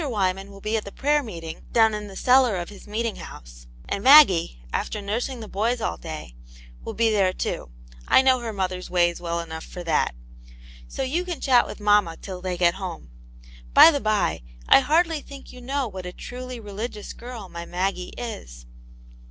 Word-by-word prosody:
Wyman 195 -3 -1
will 200 0 -13
be 215 +2 -1
at 215 - -3
the 200 - -9
prayer 295 +5 +1
meetingi 165 - -8
down 220 -2 +4
in 210 0 -4
the 195 - -11
cellar 250 -1 +4
of 175 -1 -5
his 205 0 -13
meeting 225 +1 -2
house, - - -12 0.2
and 200 - -3
Maggie,: 190 - +6
after 210 - -2
nursing 230 +5 -3
the 220 - -7
boys 230 +5 -1
all 220 - -2
day, 155 - -8 0.5
will - - -6
be 230 -1 +2
there, 195 -3 +3
too; 65 - -4 0.4
I 260 - +6
know 260 -1 +4
her 235 -2 -4
mother's 185 -2 -3
ways 175 -1 +1
well 170 -1 -2
enough 160 -1 -6
for 180 - -8
that. 160 - +1 0.7
So: - - -4
you 305 +7 -1
can 355 -3 -5
chat 250 -3 +4
with - - -8
mamma 205 -5 +3
till 185 -2 -8
they 180 -1 -3
get 175 -1 +3
home. 170 - -7 0.6
By 330 - +10
the 285 -3 -2
by, 215 - 0 0.3
I - - +8
hardly 320 +3 +2
think 280 -1 -12
you 250 - -11
know 270 +1 -2
what 185 -3 -7
a - - -5
truly 250 +5 -8
reli^ 210 +2 -5
gious 210 -3 -9
girl 235 -4 -8
my 170 -1 -8
Maggie 180 0 -2
is." - - -7
205 Hz, 195 wpm, -24 LUFS, 180-245 Hz, 0.7 s, By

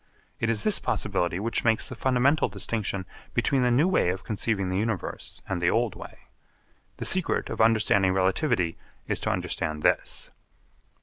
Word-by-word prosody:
It 115 - 0
is 115 -2 +1
this 215 - +3
possibility 90 -4 -1
which 115 +3 -1
makes 115 -1 +2
the - - -7
fundamental 135 +4 +2
distinction 100 -1 -1 0.3
between 135 -2 +2
the 125 - +3
new 135 +8 +3
way 185 - +2
of 95 +1 -3
conceiving 105 -3 -1
the 95 +1 0
universe 110 -3 -4
and 95 -3 -2
the 85 - +3
old 115 -2 +1
way. - - -11 0.8
The - - -5
secret 185 -2 +1
of - - -1
understanding 105 -4 +3
relativity 95 - 0 0.3
is - - +1
to - - -2
understand 75 -1 -2
this. - - +1
110 Hz, 165 wpm, -26 LUFS, 95-120 Hz, 0.8 s, this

